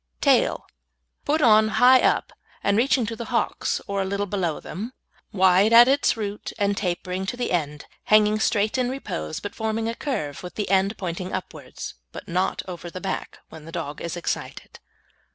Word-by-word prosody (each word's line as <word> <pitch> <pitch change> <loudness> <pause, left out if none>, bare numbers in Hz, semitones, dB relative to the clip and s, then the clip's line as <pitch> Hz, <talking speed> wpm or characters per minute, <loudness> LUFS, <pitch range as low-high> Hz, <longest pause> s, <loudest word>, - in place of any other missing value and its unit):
TAIL - - +2 0.6
Put 305 +1 +1
on 215 -2 +6
high 255 +1 +7
up, - - +1 0.3
and 200 - +2
reaching 250 +1 +2
to 225 +1 -4
the 235 - -6
hocks, - - -1
or 200 -1 -2
a - - -1
little 200 +1 -1
below 185 -5 -2
them, 220 +7 -7 0.4
wide 190 +2 +4
at 240 +1 +9
its 275 -2 +2
root 210 -1 -4
and 200 0 +1
tapering 185 0 -3
to 245 - -3
the 245 - -2
end, 150 -4 -2 0.2
hanging 215 0 +4
straight 215 +2 +1
in 250 -1 +1
repose, 80 - -4
but 205 - -6
forming 220 0 -2
a 230 - -1
curve, 210 - -4
with 180 - -9
the 210 -3 -3
end 195 +2 +2
pointing 180 0 -4
upwards, 185 - -6 0.2
but - - -9
not 180 +2 -1
over 175 -1 -7
the 185 - -7
back, 195 - -5
when 160 -1 -12
the 165 - -10
dog 155 -4 -5
is 170 +1 -4
excited. 175 - -5
200 Hz, 185 wpm, -24 LUFS, 180-225 Hz, 0.6 s, at